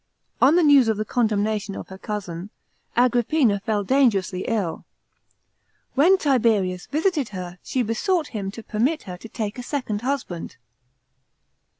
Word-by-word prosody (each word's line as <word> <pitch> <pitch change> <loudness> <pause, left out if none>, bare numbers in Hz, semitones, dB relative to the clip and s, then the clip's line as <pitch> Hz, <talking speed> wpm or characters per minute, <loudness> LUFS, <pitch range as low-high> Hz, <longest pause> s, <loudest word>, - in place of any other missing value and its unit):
On 285 +5 +6
the 350 - +4
news 285 -5 +6
of 220 -2 +1
the 215 - -2
condemnation 215 -3 0
of - - -8
her 190 - -9
cousin, 195 -4 -5 0.5
Agrippina 245 -2 +3
fell 205 0 -1
dangerously 200 -7 +2
ill. 205 -8 -1 1.1
When 340 +8 +5
Tiberius 220 - +1
visited 310 - 0
her, 180 -2 -7
she 255 - -1
besought 310 - 0
him 200 -4 -4
to 220 +3 -9
permit 255 +10 0
her 180 -1 -7
to 225 - -11
take 215 +1 -4
a - - -3
second 245 -6 -3
husband. 250 -10 -4
225 Hz, 140 wpm, -23 LUFS, 200-270 Hz, 1.1 s, On